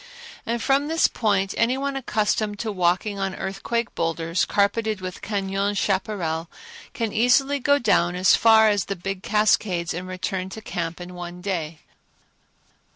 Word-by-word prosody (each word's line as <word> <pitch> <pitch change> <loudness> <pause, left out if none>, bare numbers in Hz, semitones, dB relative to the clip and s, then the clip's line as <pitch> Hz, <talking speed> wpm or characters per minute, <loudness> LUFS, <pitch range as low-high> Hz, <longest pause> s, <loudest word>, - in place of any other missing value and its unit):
And 235 0 -1
from 275 +2 +2
this 325 +1 +3
point 200 -4 0
any 235 +3 +2
one 280 0 -2
accustomed 215 -4 -1
to 220 +1 -3
walking 190 +2 0
on 195 -1 -2
earthquake 220 +5 -3
boulders, 165 +1 -1
carpeted 215 +1 0
with 185 0 -7
cañon 200 0 -1
chaparral, 180 -5 -1 0.5
can 225 -3 -2
easily 270 +5 +3
go 285 +2 +3
down 180 -8 +2
as 185 +1 +5
far 220 -1 +6
as 205 -3 +1
the 195 - -3
big 195 +1 -5
cascades 205 -5 +1
and 180 +2 -5
return 185 0 -3
to 220 - -8
camp 170 -5 -4
in 180 0 -8
one 175 0 -7
day. 170 -5 -4
200 Hz, 155 wpm, -23 LUFS, 180-220 Hz, 0.5 s, far